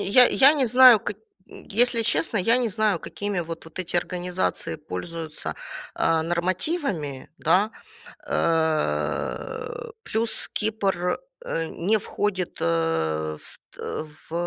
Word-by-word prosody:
я 245 Hz, +6 st, +6 dB
я 275 Hz, +4 st, +6 dB
не 275 Hz, -4 st, +2 dB
знаю, 250 Hz, 0 st, +8 dB
как 205 Hz, -, -4 dB, 0.5 s
если 235 Hz, +2 st, +4 dB
честно, 230 Hz, +2 st, +1 dB
я 225 Hz, +6 st, +4 dB
не 245 Hz, -2 st, 0 dB
знаю, 210 Hz, -2 st, +1 dB
какими 200 Hz, +2 st, -3 dB
вот 165 Hz, 0 st, -6 dB
вот 160 Hz, +2 st, -11 dB
эти 175 Hz, -1 st, -1 dB
организации 180 Hz, -1 st, -1 dB
пользуются, 160 Hz, +1 st, -5 dB, 0.4 s
а, 165 Hz, -1 st, +2 dB
нормативами, 175 Hz, -, -2 dB
да. 205 Hz, +4 st, +3 dB, 0.6 s
Э, 165 Hz, -, -1 dB
плюс 225 Hz, +1 st, 0 dB
Кипр, 195 Hz, -5 st, 0 dB, 0.2 s
э, 165 Hz, -, -2 dB
не 205 Hz, +6 st, +1 dB
входит, 195 Hz, -3 st, -2 dB
э, 80 Hz, -2 st, 0 dB
в -, -, -11 dB
ст -, -, -4 dB, 0.2 s
э, -, -, -4 dB, 0.2 s
в, -, -, -10 dB
185 Hz, 125 wpm, -25 LUFS, 165-220 Hz, 0.6 s, знаю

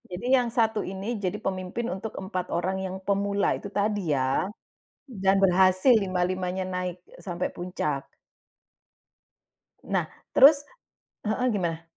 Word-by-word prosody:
Jadi 180 Hz, +6 st, -6 dB
yang 250 Hz, -2 st, +4 dB
satu 225 Hz, -2 st, +1 dB
ini 195 Hz, +5 st, -4 dB
jadi 185 Hz, -3 st, -1 dB
pemimpin 185 Hz, +4 st, -3 dB
untuk 205 Hz, +3 st, -6 dB
4 185 Hz, -2 st, -4 dB
orang 185 Hz, +3 st, -1 dB
yang 190 Hz, -1 st, -4 dB
pemula 200 Hz, 0 st, +1 dB
itu 200 Hz, -, -8 dB
tadi 205 Hz, -3 st, -1 dB
ya. 130 Hz, +8 st, 0 dB, 0.5 s
Dan 195 Hz, -8 st, +1 dB
berhasil 185 Hz, +4 st, +5 dB
lima-limanya 185 Hz, -1 st, -1 dB
naik 180 Hz, -1 st, -3 dB
e -, -, -18 dB
sampai 175 Hz, -1 st, -3 dB
puncak. 155 Hz, -6 st, -3 dB, 1.8 s
Nah, -, -, +1 dB, 0.3 s
terus 285 Hz, +1 st, +8 dB, 0.6 s
heeh, 245 Hz, +4 st, +1 dB
gimana? 170 Hz, -4 st, -2 dB
190 Hz, 125 wpm, -26 LUFS, 180-205 Hz, 1.8 s, terus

